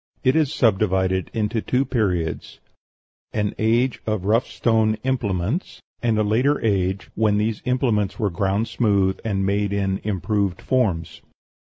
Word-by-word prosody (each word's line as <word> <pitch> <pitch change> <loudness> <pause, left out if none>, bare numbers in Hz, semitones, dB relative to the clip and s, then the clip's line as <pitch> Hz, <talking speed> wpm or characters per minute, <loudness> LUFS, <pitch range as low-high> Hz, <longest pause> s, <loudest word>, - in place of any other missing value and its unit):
It 130 +1 +3
is 155 -3 +2
subdivided 95 - +1
into 110 0 -1
two 130 +5 0
periods: 95 - -2 0.7
an 105 -1 -1
age 115 +3 +1
of 110 -4 -1
rough 115 +5 +2
stone 110 -2 +1
implements; 115 - -2 0.2
and 115 -2 +1
a 110 - +2
later 125 +8 +2
age, 95 -2 0
when 105 -1 +2
these 105 +1 -1
implements 120 -6 0
were 105 -6 0
ground 100 +5 0
smooth 100 -5 +1
and 95 -3 -1
made 100 +1 0
in 95 -1 -1
improved 100 -1 -1
forms. 90 -11 -1
105 Hz, 140 wpm, -22 LUFS, 95-115 Hz, 0.7 s, It